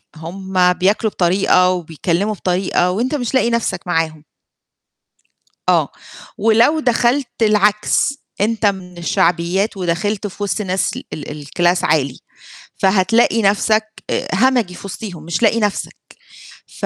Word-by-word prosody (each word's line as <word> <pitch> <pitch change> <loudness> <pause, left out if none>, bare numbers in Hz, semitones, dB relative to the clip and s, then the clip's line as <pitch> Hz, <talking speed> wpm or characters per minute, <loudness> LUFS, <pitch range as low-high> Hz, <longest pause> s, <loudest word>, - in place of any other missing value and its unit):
هُم 180 +2 0
بياكلوا 205 +4 +1
بطريقة 180 0 +3
وبيكلّموا 175 +4 -2
بطريقة 180 -2 0
وأنت 245 +10 -1
مش 245 -4 -3
لاقي 255 -3 +3
نفْسك 220 -6 -1
معاهم. 165 -3 -1 1.5
آه، - - +2 0.5
ولو 225 +8 +3
دخلت 245 0 +1
العكس، 210 +4 +2 0.3
أنت 220 +1 0
من 185 -3 -2
الشعبيات 175 +4 0
ودخلت 190 +4 -1
في 205 +1 -7
وسط 205 +2 -1
ناس 190 -1 -1
ال - - -7
ال 150 -1 -7
الClass 175 +3 +1
عالي، 140 -4 0 0.6
فهتلاقي 210 +4 +3
نفْسك 215 +2 +1
آآ - - -1
همجي 230 -3 +2
في 200 - -11
وسطيهم 190 -5 -7
مش 170 +3 -2
لاقي 230 +1 +3
نفْسك، 210 -2 -2 0.8
ف - - -2
195 Hz, 125 wpm, -18 LUFS, 175-220 Hz, 1.5 s, بطريقة